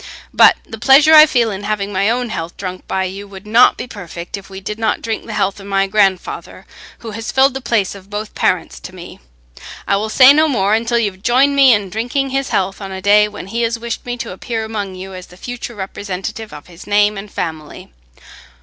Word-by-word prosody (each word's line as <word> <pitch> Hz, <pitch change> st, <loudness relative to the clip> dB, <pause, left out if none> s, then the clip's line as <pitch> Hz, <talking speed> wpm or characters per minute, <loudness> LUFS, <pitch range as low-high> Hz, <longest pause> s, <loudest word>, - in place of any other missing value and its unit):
But -, -, +6 dB
the 225 Hz, -, -9 dB
pleasure 275 Hz, +6 st, +6 dB
I 310 Hz, 0 st, +10 dB
feel 235 Hz, -5 st, +1 dB
in 200 Hz, 0 st, -6 dB
having 205 Hz, -1 st, -2 dB
my 195 Hz, +2 st, +1 dB
own 245 Hz, +1 st, -1 dB
health 170 Hz, -4 st, -5 dB
drunk 185 Hz, -1 st, -7 dB
by 190 Hz, -, -1 dB
you 195 Hz, +2 st, -6 dB
would 195 Hz, 0 st, -12 dB
not 225 Hz, +4 st, +5 dB
be -, -, -5 dB
perfect 175 Hz, -6 st, -8 dB
if 195 Hz, -1 st, -11 dB
we 190 Hz, 0 st, -8 dB
did 210 Hz, +3 st, -6 dB
not 225 Hz, -, 0 dB
drink 225 Hz, 0 st, -4 dB
the 220 Hz, -, -5 dB
health 195 Hz, 0 st, -1 dB
of 195 Hz, -, -11 dB
my 195 Hz, 0 st, +1 dB
grandfather, 195 Hz, -2 st, -1 dB, 0.4 s
who 225 Hz, -, -5 dB
has 225 Hz, +2 st, -5 dB
filled 265 Hz, 0 st, +3 dB
the 270 Hz, -, -5 dB
place 220 Hz, -6 st, 0 dB
of 195 Hz, -1 st, -14 dB
both 210 Hz, +1 st, -5 dB
parents -, -, -1 dB
to -, -, -11 dB
me. -, -, -11 dB, 0.7 s
I 200 Hz, -, +2 dB
will 215 Hz, +2 st, -3 dB
say 260 Hz, +4 st, +7 dB
no 310 Hz, +2 st, +3 dB
more, 205 Hz, -8 st, +1 dB
until 230 Hz, +2 st, +1 dB
you 220 Hz, -3 st, +1 dB
have 185 Hz, 0 st, -20 dB
joined 260 Hz, +5 st, +3 dB
me 275 Hz, -2 st, +6 dB
in 205 Hz, -4 st, +1 dB
drinking 245 Hz, +6 st, -2 dB
his 270 Hz, 0 st, -1 dB
health 195 Hz, +2 st, -1 dB
on 195 Hz, -1 st, -6 dB
a 190 Hz, -, -5 dB
day 205 Hz, +2 st, +4 dB
when 210 Hz, -, -9 dB
he 230 Hz, +5 st, -3 dB
has 230 Hz, 0 st, 0 dB
wished 235 Hz, 0 st, -5 dB
me 245 Hz, 0 st, -5 dB
to 235 Hz, -1 st, -6 dB
appear 220 Hz, +4 st, -4 dB
among 205 Hz, -4 st, -5 dB
you 190 Hz, +1 st, -9 dB
as 185 Hz, -1 st, -9 dB
the 180 Hz, -, -17 dB
future 245 Hz, +2 st, -7 dB
representative 200 Hz, +2 st, -6 dB
of 150 Hz, -1 st, -11 dB
his 175 Hz, -1 st, -14 dB
name 205 Hz, 0 st, +3 dB
and 200 Hz, 0 st, -8 dB
family." 155 Hz, -, -6 dB
210 Hz, 230 wpm, -17 LUFS, 195-235 Hz, 0.7 s, I